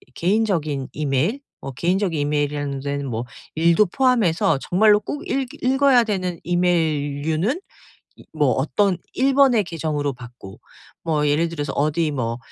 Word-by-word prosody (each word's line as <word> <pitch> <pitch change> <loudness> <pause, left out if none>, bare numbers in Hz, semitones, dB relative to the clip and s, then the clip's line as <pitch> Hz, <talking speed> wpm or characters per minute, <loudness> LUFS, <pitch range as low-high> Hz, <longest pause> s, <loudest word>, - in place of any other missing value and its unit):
개인적인 170 -8 0
이메일 150 - 0 0.2
뭐 135 - -6
개인적인 175 +5 0
이메일이라는 145 -1 -1
데는 140 0 -3
뭐 115 +1 -3 0.3
일도 170 +5 +4
포함해서 185 - +2
정말로 210 +3 +4
꼭 295 - -6
읽 270 -1 -1 0.2
읽어야 265 -1 +4
되는 185 -5 -3
이메일류는 160 - 0 0.6
이 - - -16
뭐 145 -4 +2
어떤 180 - +1 0.2
1 270 +1 +2
번의 255 -7 +4
계정으로 155 -4 -2
받고. 120 -5 -12 0.4
뭐 150 -3 0
예를 155 +4 +2
들어서 145 -4 -4
어디 155 +3 0
뭐 120 -4 -3
160 Hz, 300 characters per minute, -22 LUFS, 145-205 Hz, 0.6 s, 일도